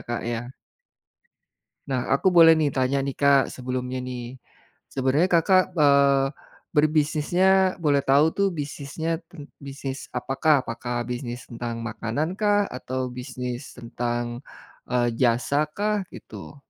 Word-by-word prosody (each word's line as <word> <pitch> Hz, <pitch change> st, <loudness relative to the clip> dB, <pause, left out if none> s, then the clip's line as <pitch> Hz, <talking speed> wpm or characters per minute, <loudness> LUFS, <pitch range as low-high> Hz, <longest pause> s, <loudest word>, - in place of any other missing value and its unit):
Kak, 120 Hz, 0 st, -4 dB
ya. 120 Hz, -1 st, -2 dB, 1.5 s
Nah 130 Hz, -2 st, -1 dB
aku 190 Hz, -, +2 dB
boleh 165 Hz, -2 st, +8 dB
nih 150 Hz, -3 st, +1 dB
tanya 135 Hz, +1 st, 0 dB
nih 140 Hz, -, -2 dB
Kak 140 Hz, -1 st, +5 dB
sebelumnya 125 Hz, 0 st, -4 dB
nih, 125 Hz, 0 st, -7 dB, 0.5 s
sebenarnya 135 Hz, +6 st, +2 dB
Kakak, 185 Hz, +2 st, +3 dB
eee, 140 Hz, -3 st, +4 dB, 0.5 s
berbisnisnya 160 Hz, +5 st, +3 dB
boleh 145 Hz, -2 st, +3 dB
tahu 140 Hz, +3 st, +4 dB
tuh 200 Hz, -, +3 dB
bisnisnya 150 Hz, +3 st, -4 dB
tent 145 Hz, -1 st, -11 dB
bisnis 135 Hz, -1 st, -7 dB
apakah? 135 Hz, +3 st, +2 dB
Apakah 120 Hz, +1 st, -3 dB
bisnis 120 Hz, 0 st, -5 dB
tentang 115 Hz, -1 st, -5 dB
makanan 120 Hz, -, -3 dB
kah? 205 Hz, -1 st, +3 dB
Atau 130 Hz, 0 st, -4 dB
bisnis 125 Hz, 0 st, -6 dB
tentang, 120 Hz, 0 st, -3 dB, 0.5 s
eee, 120 Hz, -1 st, +1 dB
jasa 130 Hz, +5 st, +1 dB
kah? 205 Hz, -1 st, -1 dB
Gitu. -, -, -10 dB
135 Hz, 120 wpm, -24 LUFS, 125-155 Hz, 1.5 s, boleh